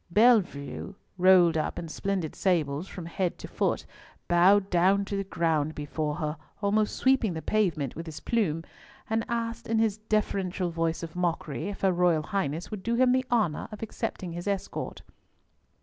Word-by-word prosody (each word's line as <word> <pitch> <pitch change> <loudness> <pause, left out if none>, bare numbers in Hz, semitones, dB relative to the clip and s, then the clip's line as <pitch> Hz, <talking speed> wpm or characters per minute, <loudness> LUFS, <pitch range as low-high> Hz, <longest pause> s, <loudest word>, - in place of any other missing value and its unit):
Bellievre, 200 -5 +2 0.2
rolled 180 -3 +6
up - - -2
in 165 - -4
splendid 185 -1 -2
sables 160 -3 0
from 180 -4 -8
head 175 +1 -2
to - - -8
foot, - - -1 0.4
bowed 190 +3 +4
down 190 +3 +3
to 200 - -4
the 195 - -1
ground 160 -4 0
before 150 0 -2
her, 155 -1 -3 0.2
almost 210 +1 +1
sweeping 260 -7 +2
the 160 - -4
pavement 170 - 0
with 165 +1 -7
his 155 -1 -7
plume, 170 -9 0 0.5
and 225 0 +2
asked 230 0 -3
in 225 - +1
his 220 -2 +2
deferential 195 -4 -1
voice 165 0 -1
of 165 0 -7
mockery 170 -1 -2
if 205 - -7
her 190 -1 +3
Royal 175 -3 +3
Highness 175 -1 -2
would 210 -3 -5
do 230 +4 0
him 250 +1 +4
the 255 0 +2
honour 215 -11 +1
of 215 +1 -7
accepting 190 -4 -4
his 175 +3 -6
escort. 200 -2 -3
185 Hz, 170 wpm, -28 LUFS, 165-210 Hz, 0.5 s, rolled